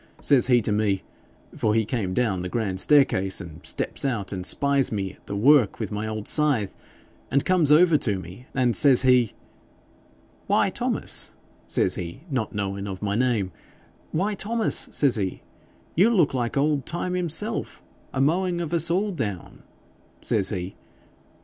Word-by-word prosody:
Says 135 -5 +3
he 125 -2 +4
to 105 - -2
me 105 -2 0 0.5
for 110 -1 0
he 110 -1 +2
come 100 -5 -2
down 105 -7 0
the 90 - -4
grand 100 -4 -2
staircase, 95 -9 +3
and 85 -4 -10
steps - - -3
out 115 -8 -2
and 90 -1 -4
spies 140 +7 +2
me 100 -3 -3
at - - -25
the 100 - -4
work 125 +1 +4
with 110 -3 -4
my 105 +1 -3
old 110 -1 -5
scythe, 140 -10 +1 0.5
and 140 - +1
come 185 -3 +3
across 155 +1 +5
to 105 -4 0
me, 95 +8 -11
and 125 -4 +2
says 135 +2 +6
he, 125 -3 +3 1.1
"Why, - - +2
Thomas," - - -1 0.3
says 90 - +1
he, 85 +7 -6
not 125 -5 -2
knowin' 100 0 -3
of 95 0 -6
my 100 -1 -1
name, 110 -5 0 0.6
"Why, 195 +6 0
Thomas," 220 +2 0
says 140 -6 +2
he, 95 -3 -3 0.5
"you 195 +8 +4
look 180 -13 +2
like 120 0 -2
old 145 -1 +1
Time 175 +2 -3
himself 180 +5 -2 0.3
a 135 - -4
mowing 175 +5 +1
of 170 -1 -4
us 170 0 +2
all 195 +5 0
down," 105 - -5 0.6
says 100 -3 +1
he. 95 -2 -4
120 Hz, 165 wpm, -24 LUFS, 100-150 Hz, 1.1 s, says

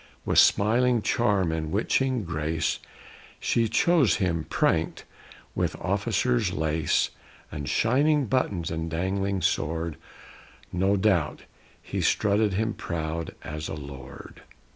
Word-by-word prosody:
With - - +4
smiling 120 +2 +4
charm 100 -7 +1
and 80 -1 -3
witching 125 +4 +1
grace 80 -1 -1 0.6
She 115 -1 +1
chose 170 - +3
him 85 -5 -1
pranked - - 0 0.5
with - - -1
officer's - - 0
lace 80 +1 +1 0.4
And 75 -3 -5
shining 140 +5 +2
buttons 105 -9 -1
and 80 0 -3
dangling 95 +3 -1
sword; 80 +1 -1 0.8
No 95 +3 +2
doubt 95 -7 +1 0.4
he - - -4
strutted 105 0 +2
him 110 +3 0
proud 80 -1 -4
as 75 +1 -5
a - - -4
lord! 70 -3 -10
95 Hz, 115 wpm, -26 LUFS, 80-110 Hz, 0.8 s, With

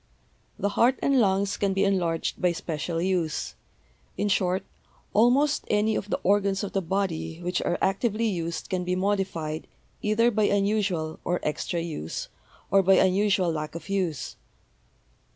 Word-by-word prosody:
The 200 - 0
heart 240 +5 +3
and 275 -2 +3
lungs 200 0 +1
can 200 -1 +1
be 195 - +2
enlarged 175 -5 0
by 180 -1 +3
special 165 0 -3
use; 175 -3 -1 0.6
in 205 - 0
short, 185 0 +1 0.5
almost 260 +7 +3
any 210 +1 +2
of 205 - -3
the - - -1
organs 200 0 +2
of 200 - -4
the 195 - +1
body 175 -3 -2
which 180 +1 -1
are 175 - 0
actively 215 +3 +1
used 170 -5 -2
can 185 -2 -2
be 180 +1 -1
modified 185 -5 -1 0.3
either 230 +3 +3
by 215 -1 +2
unusual 200 -6 0
or 175 0 0
extra 150 +3 -2
use, 150 - -5 0.4
or 195 +1 +6
by 190 +1 +5
unusual 190 -1 +3
lack 155 0 -4
of 170 +2 -8
use. 180 -7 -2
190 Hz, 150 wpm, -26 LUFS, 170-205 Hz, 0.6 s, or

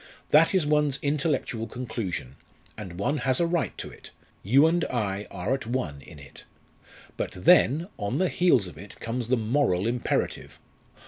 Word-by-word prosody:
That 165 +5 +5
is 180 -5 +3
one's 150 -2 +2
intellectual 140 -6 -1
conclusion; 110 - -5 0.4
and 95 -5 -8
one 140 +10 0
has 130 -3 +1
a 170 - +3
right 170 0 -1
to - - -6
it - - -13 0.3
you 135 +10 +5
and 165 +1 +2
I 105 -4 -2
are 125 - -2
at 135 -4 -3
one 90 - -3
in 75 +2 -13
it. 70 -2 -14 0.7
But - - -3
then 160 - +4
on 105 +5 -2
the 185 +1 +2
heels 175 - +3
of 85 -4 -10
it 100 +2 -12
comes 115 0 -3
the 130 +1 +2
moral 110 -5 +1
imperative! 120 +1 -2
125 Hz, 170 wpm, -26 LUFS, 100-150 Hz, 0.7 s, That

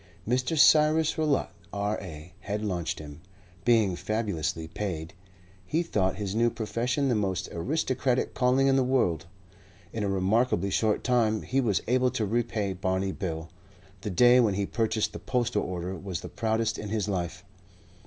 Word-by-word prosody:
Mr. 130 +6 0
Cyrus 155 +1 +5
Rowlatt, 155 -3 +1 0.2
R.A., 95 -5 -4
had 105 +1 -4
launched 90 -5 -2
him. 75 +1 -10 0.4
Being 110 -6 +3
fabulously 85 -7 -2
paid, 85 -2 -4 0.5
he 160 - 0
thought 95 - 0
his 100 -1 -3
new 115 +2 +3
profession 120 +5 -1
the 125 - +2
most 95 -5 -1
aristocratic 130 - 0
calling 130 +2 +3
in 135 0 +4
the 135 - +3
world. 90 - +1 0.7
In 110 - -2
a 100 - 0
remarkably 100 +1 +1
short 110 +1 +1
time 115 -4 +2
he 135 +1 +1
was 110 -6 +1
able 125 +1 +3
to 110 - -1
repay 110 -2 -1
Barney 95 +1 -1
Bill. 80 -4 -5 0.5
The 105 - -4
day 120 +7 +6
when 110 -5 +3
he 100 0 0
purchased 110 0 -1
the - - -6
postal 125 -2 0
order 90 +1 -4
was 95 -1 -5
the - - -7
proudest 110 0 -1
in 105 - -5
his 105 -1 -1
life. 90 -1 -3
105 Hz, 160 wpm, -28 LUFS, 95-125 Hz, 0.7 s, day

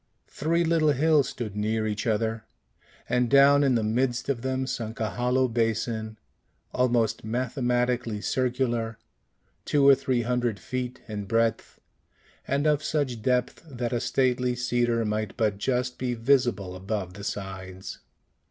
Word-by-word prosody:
Three 165 +3 +1
little 160 -2 +3
hills 150 0 +3
stood 110 -4 -6
near 110 +1 0
each 105 +1 -2
other, 110 0 0 0.6
and 125 -1 +1
down 140 +1 +6
in 135 -3 +3
the 115 - +1
midst 120 +4 0
of 130 -4 -1
them 130 +1 -1
sunk 115 -4 -4
a 110 -1 -1
hollow 125 +1 +1
basin, 110 -1 -1 0.6
almost 120 -3 +1
mathematically 120 -1 -1
circular, 120 -2 -1 0.7
two 140 -2 +3
or 140 - +10
three 130 -3 0
hundred 120 -3 -1
feet 125 +4 -4
in 105 -2 -5
breadth, 115 +1 0 0.7
and 140 +2 0
of 150 -1 +2
such 135 -8 -1
depth 125 +1 0
that 120 -2 -3
a 120 - +1
stately 125 0 +1
cedar 120 -2 0
might 105 -1 -2
but 105 -3 0
just 125 +1 -1
be 125 -1 -1
visible 115 -6 +1
above 95 -1 -4
the 100 +1 -10
sides. 95 -2 -6
120 Hz, 145 wpm, -26 LUFS, 110-130 Hz, 0.7 s, or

